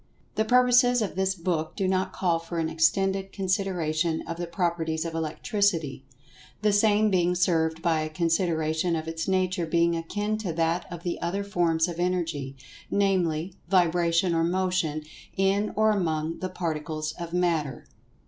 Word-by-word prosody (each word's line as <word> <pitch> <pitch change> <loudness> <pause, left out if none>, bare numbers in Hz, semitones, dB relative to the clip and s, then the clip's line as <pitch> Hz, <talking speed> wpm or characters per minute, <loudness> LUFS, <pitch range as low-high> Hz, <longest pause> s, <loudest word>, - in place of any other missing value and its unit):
The 220 - 0
purposes 245 0 +4
of 200 - -3
this 190 0 0
book 165 -3 -2
do 190 - 0
not 185 0 0
call 170 -3 0
for 165 +1 -6
an 160 -1 0
extended 195 +4 +1
consideration 180 -5 -1
of 165 - -4
the 175 0 -4
properties 170 -2 -1
of 165 - -4
Electricity, 165 - -1 0.6
the 210 -1 +3
same 210 0 +3
being 180 -1 +2
served 165 -2 +1
by 165 -2 +2
a 155 - -3
consideration 165 0 0
of 160 0 -4
its 165 0 -4
nature 185 -2 0
being 170 +1 +2
akin 205 +6 -2
to 195 -6 -3
that 165 +2 -1
of 170 -1 -7
the 175 - -3
other 190 +4 -1
forms 170 -4 +1
of 175 -1 -6
Energy, 165 -7 -1 0.3
namely, 185 -4 +1 0.2
"vibration 175 -1 +3
or 165 0 +2
motion 175 -3 0 0.3
in 195 +2 +2
or 220 0 +4
among 165 -5 -1
the 185 - -3
Particles 155 -3 -3
of 170 -1 -5
Matter." 165 -7 0
175 Hz, 160 wpm, -26 LUFS, 160-190 Hz, 0.6 s, purposes